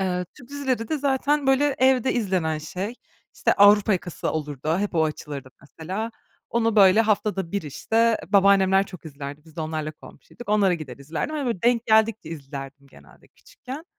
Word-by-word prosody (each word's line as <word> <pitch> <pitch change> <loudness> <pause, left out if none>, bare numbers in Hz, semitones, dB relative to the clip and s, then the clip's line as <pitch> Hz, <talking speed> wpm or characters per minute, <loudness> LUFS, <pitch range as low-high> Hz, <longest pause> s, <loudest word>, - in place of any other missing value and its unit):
Eee, 180 -1 -1
Türk 245 - -15
dizileri 265 -5 -2
de 310 - -1
zaten, 280 +1 +1
böyle, 270 +1 +3
evde 260 -1 +3
izlenen 185 -9 0
şey, 185 +8 -5 0.4
işte, - - +2
Avrupa 205 +1 +6
Yakası 175 -2 -3
olurdu. 150 +1 -2
Hep 205 -1 -2
o 160 -1 +3
açılırdı 145 -3 -6
mesela. 185 +10 -5 0.4
Onu 230 -1 +1
böyle 195 +1 +7
haftada 210 -5 0
bir, 200 - -1
işte, 225 +10 +1
babaannemler 195 -1 +4
çok 180 -3 -12
izlerdi, 145 0 -8
biz 160 0 -19
de - - -4
onlarla 155 -1 -4
komşuyduk. 225 +8 -14
Onlara 200 -3 +3
gider 150 -7 -8
izlerdim, 155 - -4
hani, 285 -3 -2
böyle, 230 -7 -2
denk 235 -1 +2
geldikçe 220 -4 +2
izlerdim 140 -2 -8
genelde - - -19
küçükken. 295 - -11
195 Hz, 165 wpm, -24 LUFS, 155-230 Hz, 0.4 s, böyle